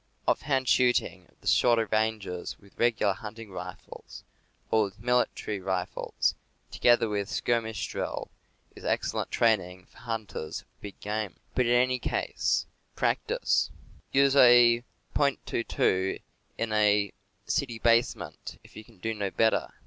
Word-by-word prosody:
Ofi'hand 135 -2 +1
shooting 120 -8 +2
at - - -30
the - - -10
shorter 115 -2 +4
ranges 110 -5 -1
with 100 -1 -21
regular 115 -4 +2
hunting 110 +2 -9
rifles, 90 -1 -9 0.5
or 110 -1 +4
with 95 -1 -10
military 120 -3 0
rifles, 95 -1 -1 0.4
together 120 -1 +4
with 105 -1 -2
skirmish 115 -3 -1
drill, - - -4 0.4
is - - -12
excellent - - -1
training 95 -5 +1
for - - -20
hunters 110 -9 -5
of - - -35
big 100 -1 -9
game. 105 -2 -3 0.2
But 125 -2 +2
in 120 - +4
any 125 +1 +3
case, - - 0 0.3
practice! - - +1 0.4
Use 140 0 +4
a 120 -2 +7 0.3
.22 115 -8 0 0.4
in 110 -1 -2
a 105 -1 +3 0.3
city 135 -6 -1
base 115 +1 +3
ment, - - -9
if - - -18
you 110 - -9
can 110 -1 -21
do 110 +5 -3
no 100 -2 -2
better. 110 +3 +2
110 Hz, 135 wpm, -28 LUFS, 100-120 Hz, 0.5 s, a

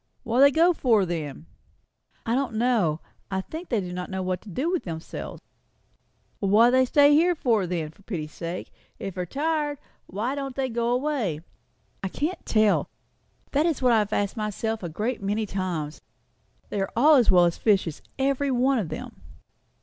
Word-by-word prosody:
"What 230 +2 0
do 275 - +9
they 280 - +6
go 335 +4 +4
for 225 - +3
then?" 160 -3 -5 0.8
"I 230 - 0
don't 260 -3 -1
know. 215 -10 +1 0.3
I 190 -1 -1
think 320 - -8
they 230 - +1
do 180 -2 -5
not 180 0 -5
know 190 -1 -3
what 185 0 -2
to 215 - -12
do 270 - -1
with 365 - -1
themselves." 160 -2 -6 1.0
"What 210 +4 +5
do - - +1
they 260 0 +4
stay 285 +3 +5
here 345 +4 +4
for, 230 - +1
then, 165 -3 -3
for 165 - -23
pity's 165 -7 -5
sake? 170 +1 -6 0.3
If 195 - -5
they 180 - -4
are - - -2
tired, 295 - -1 0.3
why 220 +8 -2
don't 275 -2 -4
they 265 -1 -1
go 235 0 -1
away?" 245 - -1 0.6
"I 195 - -2
can't 305 - -3
tell. 215 -2 +3 0.6
That 295 +4 +2
is 315 -5 -1
what 250 - +5
I 225 - +5
have 210 0 -1
asked 205 0 0
myself 220 +1 -2
a 175 - -4
great 215 +9 -3
many 205 +2 -1
times. 180 -6 -4 0.7
They 200 - -2
are 195 - -2
all 295 +7 +6
as 255 -6 +5
well 180 -2 +6
as 170 - -1
fishes, 195 -8 +1 0.2
every 275 +1 +1
one 260 0 +2
of 185 -7 -3
them." 155 - -8
220 Hz, 195 wpm, -25 LUFS, 185-270 Hz, 1.0 s, do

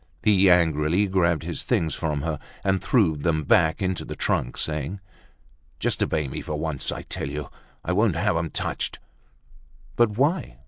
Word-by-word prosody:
He 100 -2 +5
angrily 85 +1 +3
grabbed 85 -5 +1
his - - -3
things 80 -1 0
from 75 -3 -2
her 80 -2 -2 0.2
and 95 -1 +1
threw 100 -11 +3
them 80 +1 0
back 80 +6 +3
into 95 -1 -1
the - - -6
trunk, 60 - -1
saying: 75 +5 -3 0.8
"Just - - 0
obey 75 -2 0
me, 65 - -5
for 75 - -4
once! 75 -3 -1
I - - -5
tell - - -4
you 75 -1 -6 0.3
I 85 - -1
won't 100 -1 +2
have 100 +2 +1
'em 80 0 -1
touched!" - - -3 1.0
"But 110 -3 +3
why?" 140 - 0
85 Hz, 170 wpm, -25 LUFS, 75-95 Hz, 1.0 s, He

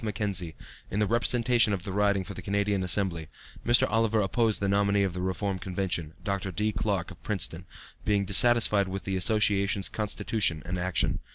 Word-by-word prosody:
Mackenzie, 100 -6 -2 0.3
in 95 - -4
the 105 - +2
representation 115 0 +2
of 95 -3 -4
the 95 - -6
riding 100 0 +1
for 95 - -8
the - - -9
Canadian 100 -1 -1
Assembly, 90 -4 0 0.4
Mr. 120 +1 +4
Oliver 115 0 +1
opposed 110 +2 +1
the 100 - -1
nominee 100 0 +2
of 95 -3 -2
the 90 - -5
Reform 95 +1 -2
convention, 90 -4 -3
Dr. 100 -1 -3
D. 105 +5 -1
Clarke, 100 -3 -2
of 85 -2 -14
Princeton, 90 -3 -2 0.4
being 100 -1 +1
dissatisfied 105 -1 +5
with 95 +1 -5
the 95 - -3
Association's 100 0 +1
constitution 105 -6 -1
and 90 +1 -4
action. 90 0 -1
100 Hz, 175 wpm, -27 LUFS, 95-105 Hz, 0.4 s, dissatisfied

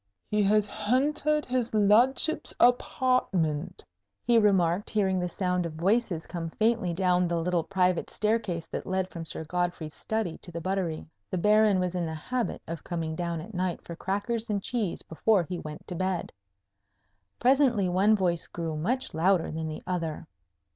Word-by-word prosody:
"He 210 0 0
has 205 +1 +3
hentered 290 +8 +1
his 245 -3 -1
ludship's 235 +9 +3
apawtment," 240 - +1 0.4
he 235 -1 +4
remarked, 190 -3 +2
hearing 190 -3 +1
the 180 - -1
sound 180 0 -1
of 170 -2 -4
voices 180 0 0
come 165 -2 -5
faintly 220 -1 +1
down 180 0 +2
the 170 0 -1
little 175 0 0
private 185 -2 +1
staircase 210 -6 -1
that - - -6
led 190 0 -1
from 165 -1 -6
Sir 160 - -5
Godfrey's 175 -2 -2
study 220 -7 -3
to 175 - -11
the 170 - -5
buttery: 180 -2 -2 0.2
the - - -2
Baron 210 +1 +4
was 180 -1 -1
in 175 -2 -1
the 160 - -4
habit 245 +10 -3
of 165 0 -6
coming 165 -2 -3
down 170 -1 -2
at 210 +7 -10
night 180 -1 -1
for 170 - -8
crackers 220 +6 -2
and 200 -2 -1
cheese 225 -8 -2
before 190 +4 +2
he 175 +1 -5
went 150 -1 -8
to - - -6
bed. 185 0 -2 1.1
Presently 250 -6 +3
one 195 +4 +4
voice 175 -4 0
grew 165 -2 -4
much 250 +12 -1
louder 175 +2 +2
than 160 0 -3
the 155 - -6
other. 165 -3 -3
185 Hz, 170 wpm, -28 LUFS, 170-215 Hz, 1.1 s, he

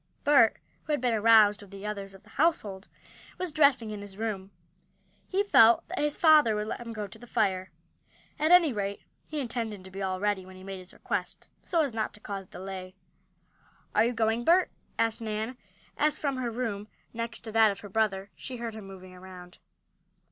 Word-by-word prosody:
Bert, 280 -6 +5 0.3
who 305 - -1
had 295 - +1
been 245 -1 +1
aroused 215 -1 +5
with 200 - -13
the 200 +1 -9
others 200 -2 -5
of 195 - -16
the 215 - -20
household, 215 - 0 0.5
was 365 -2 -3
dressing 280 -7 +3
in 210 -1 -6
his 200 -1 -11
room. 205 -4 -3 0.8
He 390 +2 +1
felt 235 - +6
that 370 - -4
his 295 0 0
father 305 -9 +6
would 210 0 -2
let 220 - -5
him 235 -1 -7
go 215 -2 -4
to 200 +2 -11
the 245 - -13
fire. 190 -4 0 0.7
At 310 +2 +2
any 345 -6 +6
rate 200 -1 -3 0.2
he 305 - -4
intended 230 -6 -4
to 190 - -12
be 195 +1 -6
all 185 -1 -2
ready 205 -1 0
when 185 0 -13
he 185 - -12
made 195 0 -6
his 180 0 -12
request, - - -4
so 335 -2 +1
as 275 -6 -3
not 220 -1 -2
to - - -12
cause 195 -3 -6
delay. 185 0 -8 1.0
"Are - - +4
you 240 - 0
going, 225 +1 +1
Bert?" 350 +7 +4 0.3
asked 225 0 +1
Nan, 220 +2 -3 0.4
as 300 0 +2
from 275 -3 -2
her 250 -2 -2
room, 220 -3 -3 0.3
next 230 0 -4
to 225 - -7
that 220 0 +5
of 200 -1 -5
her 205 - -9
brother, 200 -2 0
she 255 - -7
heard 235 -1 -5
him 215 -3 -9
moving 185 -1 -11
around. 180 -1 -12
220 Hz, 205 wpm, -28 LUFS, 195-245 Hz, 1.0 s, felt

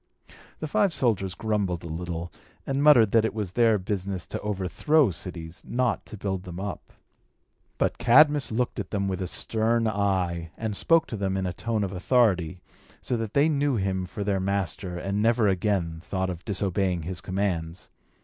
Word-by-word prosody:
The 155 - -3
five 180 +2 +2
soldiers 100 -7 0
grumbled 100 -6 -1
a - - -6
little, 85 +1 -5 0.3
and 135 +1 -1
muttered 125 -9 +6
that 115 -1 +4
it 110 - -1
was 105 -5 -3
their 115 +1 +4
business 95 -1 -3
to - - -5
overthrow 105 - +2
cities, 85 -1 -6
not 125 -3 -1
to 110 - -8
build 95 -2 -2
them 90 -1 -8
up. 100 -1 -6 0.8
But - - 0
Cadmus 145 +4 +5
looked 125 +2 -1
at - - -4
them 100 -2 -1
with 95 0 -2
a 90 - -2
stern 115 +3 0
eye, 95 -5 -1
and 110 -2 -3
spoke 165 +8 +3
to 110 - -5
them 95 -1 -1
in, 95 - -1
a 90 - -2
tone 110 +2 -1
of 100 -1 -3
authority, 95 -4 +2 0.4
so 125 - -2
that 115 -2 -5
they 145 +2 +5
knew 145 -3 +1
him 95 -3 -1
for 100 +3 -5
their 100 -1 0
master, 95 -2 -2
and 100 +3 -2
never 115 0 +3
again 95 -4 0
thought 95 +1 -2
of 90 0 -8
disobeying 95 -3 0
his 85 +1 -5
commands. 90 -3 -3
100 Hz, 180 wpm, -26 LUFS, 90-115 Hz, 0.8 s, muttered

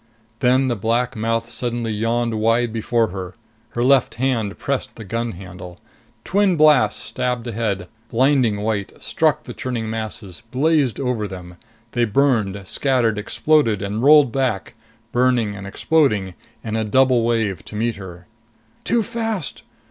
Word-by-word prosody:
Then 130 +1 +3
the 120 - 0
black 115 +4 0
mouth 115 +1 -1
suddenly 120 -2 -3
yawned 115 +1 0
wide 115 +1 +2
before 115 0 +1
her. 90 -1 -7 0.4
Her 120 - 0
left 135 0 +3
hand 115 -5 -1
pressed 140 -1 -3
the 110 - -9
gun 115 +3 -3
handle. 90 -1 -10 0.4
Twin 195 -1 +2
blasts 150 -4 +4
stabbed 125 -1 -2
ahead, 105 -6 -2 0.2
blinding 125 -4 +2
white, 105 -2 -3
struck - - +1
the - - -8
churning 120 -3 -3
masses, 110 -4 -5
blazed 140 -1 +1
over 125 -6 -1
them. 90 -2 -9 0.4
They 120 -1 +1
burned, 110 -4 +1
scattered, 120 -2 +1
exploded, 115 -2 +1
and 105 +3 -3
rolled 145 -1 +6
back, 125 -7 -1 0.4
burning 120 -4 +2
and 100 0 -8
exploding, 105 - +1 0.3
in 110 -1 -3
a 110 - 0
double 130 +3 +3
wave 110 -6 0
to - - -9
meet 115 0 -1
her. 90 -3 -10 0.6
"Too 235 -1 +1
fast!" 225 - -3
115 Hz, 145 wpm, -21 LUFS, 105-130 Hz, 0.6 s, rolled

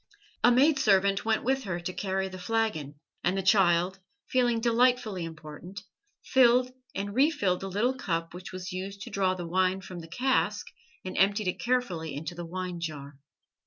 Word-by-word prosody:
A 245 - +7
maid 275 +4 +4
servant 195 -4 +3
went 220 -1 +1
with 265 0 0
her 175 -3 -2
to 175 +2 -5
carry 190 0 -2
the 185 0 -9
flagon, 180 -8 -1 0.3
and 180 +2 +1
the 195 - -1
child, 185 -1 +3 0.3
feeling 245 -2 +2
delightfully 235 -4 +2
important, 165 +5 -9 0.4
filled 250 -1 +4 0.2
and 200 +1 -3
refilled 255 - +2
the 195 - -5
little 220 +7 +1
cup 165 -9 -3
which 180 +1 -8
was 185 +1 -6
used 195 +2 -6
to - - -7
draw 190 -1 +1
the 175 -2 -5
wine 185 +2 +1
from 185 -1 -8
the 165 - -9
cask 255 +10 0 0.4
and 185 - -5
emptied 200 +1 +3
it - - -4
carefully 185 - -1
into 155 +4 -5
the 175 0 -7
wine 180 0 -4
jar. 145 -4 -6
190 Hz, 175 wpm, -28 LUFS, 175-230 Hz, 0.4 s, A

